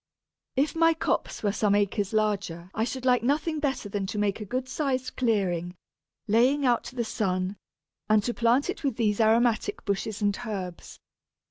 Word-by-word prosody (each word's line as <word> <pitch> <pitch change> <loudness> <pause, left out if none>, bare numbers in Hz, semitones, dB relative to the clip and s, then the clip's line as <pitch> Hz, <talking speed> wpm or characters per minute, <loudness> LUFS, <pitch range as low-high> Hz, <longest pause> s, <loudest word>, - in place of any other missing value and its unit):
If 280 +3 +1
my 330 0 +4
copse 315 - -2
were 205 - +2
some 205 0 +2
acres 205 0 0
larger 200 -5 -1
I 220 - 0
should 260 +1 -5
like 250 -1 +4
nothing 300 +5 0
better 275 -7 -1
than 200 -1 -3
to 210 - -4
make 205 0 0
a - - -4
good 255 +5 -3
sized 260 -1 -2
clearing, 185 -7 0 0.5
laying 255 +7 +3
out 240 -2 +3
to 255 - -9
the 235 -2 -1
sun, 185 -3 -1 0.5
and 215 -1 +4
to 240 - -1
plant 240 +4 +2
it 370 - -4
with 275 -5 0
these 215 -2 +1
aromatic 230 - +2
bushes 200 +1 -2
and 205 -2 +1
herbs. 190 -6 -6
220 Hz, 175 wpm, -27 LUFS, 200-255 Hz, 0.5 s, my